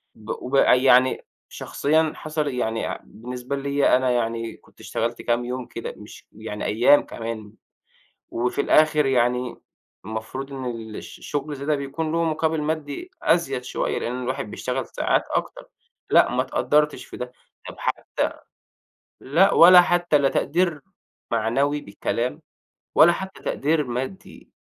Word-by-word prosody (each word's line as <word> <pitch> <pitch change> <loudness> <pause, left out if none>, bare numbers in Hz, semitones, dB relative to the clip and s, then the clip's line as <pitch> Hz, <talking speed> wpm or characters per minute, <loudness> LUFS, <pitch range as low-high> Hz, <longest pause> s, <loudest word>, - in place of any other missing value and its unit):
ب 110 0 -15
ويعني 130 -1 +4 0.2
شخصيًا 155 +2 0
حصَل 155 -1 -3
يعني 115 -4 -2
بالنسبة 125 +3 -6
لي 140 -1 +2
أنا 130 0 +1
يعني 115 -1 -2
كنت - - -25
اشتغَلت 115 +1 -3
كام 120 0 0
يوم 125 0 -4
كده، 115 -1 -7
مش 105 - -13
يعني 105 -1 -6
أيَّام 120 +7 +5
كمان، 115 -2 -7 0.8
وفي 125 +4 -1
الآخِر 155 0 +4
يعني، 125 -1 +1 0.5
المفروض 110 +6 -5
إن 135 -1 -5
ال 115 -3 -6
الش - - -9
الشغل 145 +1 -4
الزيادة 145 +1 -1
ده - - 0
بيكون 145 +3 -3
له 165 +1 +1
مقابِل 160 -1 0
مادي 155 - -4
أزيد 135 -7 +1
شوية، - - -2
لأن 125 +2 -3
الواحد 125 -4 -3
بيشتغَل 130 0 -3
ساعات - - 0
أكتر. - - -3 0.4
لأ، - - +5
ما - - +1
اتقدِّرتِش 150 0 +1
في - - -10
ده، 125 0 -6 0.4
طب - - -10
حتى - - -2 0.9
لأ، 175 +9 +3
والّا 180 +1 +9
حتى 175 -3 +2
لا 140 -1 +2
تقدير 165 0 0 0.5
معنوي 135 +6 +1
بكلام، 120 +8 -3 0.5
والّا 170 - +8
حتى 190 +2 -6
تقدير 150 +2 0
مادي. 130 +10 -6
135 Hz, 140 wpm, -23 LUFS, 120-150 Hz, 0.9 s, والّا